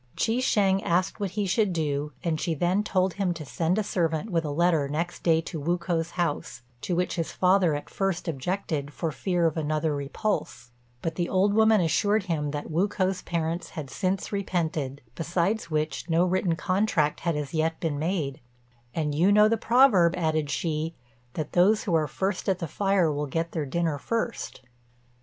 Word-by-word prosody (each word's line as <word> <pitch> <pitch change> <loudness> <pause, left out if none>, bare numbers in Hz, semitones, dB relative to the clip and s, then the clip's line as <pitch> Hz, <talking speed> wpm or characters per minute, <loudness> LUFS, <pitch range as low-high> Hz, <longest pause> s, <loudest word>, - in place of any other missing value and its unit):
Chi 230 +3 +1
shêng 195 -6 +2
asked 180 +2 0
what 200 -2 -1
he 205 - +1
should 195 +2 +2
do, 150 -2 -1
and 160 -3 -1
she 165 -3 -1
then 180 +6 +1
told 185 -3 +1
him 180 -1 -1
to 155 -2 -7
send 165 +6 0
a 215 - +1
servant 170 0 -1
with 165 -2 +1
a 150 - -3
letter 160 -1 +2
next 165 +5 -3
day 165 -1 +3
to 165 -1 -6
Wu 170 +5 0
k'o's 170 -1 -1
house, 155 -7 -2 0.2
to 180 - -1
which 180 +1 -1
his 165 - -2
father 180 -4 +3
at 145 - -5
first 195 -3 -2
objected 155 -1 -2
for 165 -2 -2
fear 175 +2 0
of 165 0 +1
another 155 0 0
repulse; 140 - -3 0.3
but 165 - -1
the 175 +1 -2
old 195 +2 +3
woman 220 -1 +5
assured 205 +5 +2
him 160 -5 -1
that 145 +2 -5
Wu 175 +6 +2
k'o's 190 -2 -1
parents 170 0 -2
had 145 -4 -5
since 190 0 -1
repented, 160 -9 -2
besides 170 - -1
which 155 +1 -2
no 165 +2 +3
written 180 -2 +1
contract 180 -3 +1
had 170 -2 -1
as 150 0 -4
yet 160 0 0
been 150 -4 -2
made; 155 -4 -2 0.6
"and 150 -2 -1
you 175 +7 +3
know 210 +1 +6
the 225 - +2
proverb," 225 -7 +4
added 155 -3 0
she, 160 +2 -2 0.4
"that 155 - -3
those 200 +5 +4
who 180 - -2
are 155 -2 +3
first 190 +6 -2
at 190 - +2
the 170 - -4
fire 195 0 +2
will 145 0 -2
get 165 +4 -2
their 155 -3 -3
dinner 160 0 -1
first." 230 - -3
170 Hz, 190 wpm, -26 LUFS, 155-190 Hz, 0.6 s, know